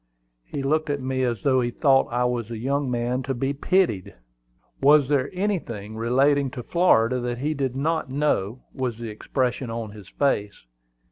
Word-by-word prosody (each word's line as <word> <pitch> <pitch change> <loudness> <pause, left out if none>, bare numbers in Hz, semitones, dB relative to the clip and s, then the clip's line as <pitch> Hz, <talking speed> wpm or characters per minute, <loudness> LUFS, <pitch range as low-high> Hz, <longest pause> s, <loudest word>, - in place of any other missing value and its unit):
He 135 - -5
looked 155 +3 +1
at 145 -1 0
me 130 0 -2
as 120 -5 -1
though 130 -2 +3
he 120 - 0
thought 135 +1 +3
I 125 +1 +1
was 120 -2 -1
a 115 - -5
young 140 +4 -1
man 120 +1 -1
to 135 0 -3
be 135 +3 -1
pitied. 145 - 0 0.7
Was 145 0 +6
there 140 -1 +1
anything 160 - -3
relating 135 +5 +2
to 120 - -4
Florida 125 -9 +3
that 120 0 -3
he 150 +5 -1
did 135 -3 -2
not 155 +1 -1
know, 130 -5 -1
was 125 -4 -3
the 115 -1 -6
expression 125 +3 -2
on 115 -2 -4
his 105 -3 -12
face. 105 - -1
130 Hz, 180 wpm, -24 LUFS, 120-140 Hz, 0.7 s, Was